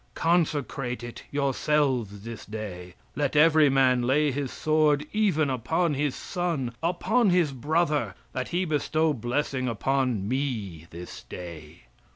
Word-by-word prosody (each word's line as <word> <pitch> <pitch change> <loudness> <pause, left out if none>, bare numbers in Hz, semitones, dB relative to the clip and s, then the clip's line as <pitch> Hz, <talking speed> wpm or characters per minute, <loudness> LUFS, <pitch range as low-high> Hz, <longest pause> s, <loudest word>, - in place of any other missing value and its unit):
Consecrate 145 -7 0
it, 120 0 -8
yourselves 135 -6 0
this 115 -1 -7
day. 95 -5 -7 0.2
Let 145 0 -1
every 155 -1 +6
man 130 -2 +3
lay 140 +4 +2
his 135 -1 -3
sword 155 -1 +2
even 180 -10 +2
upon 160 +7 0
his 145 -1 -1
son, 165 -9 -2
upon 180 +7 +2
his 175 -5 +3
brother, 150 +4 0 0.2
that 130 -1 -3
he 180 +2 0
bestow 155 0 +1
blessing 130 +2 -1
upon 125 -3 0
Me 110 - -3
this 85 +1 -9
day." 85 -3 -9
135 Hz, 130 wpm, -27 LUFS, 120-155 Hz, 0.2 s, every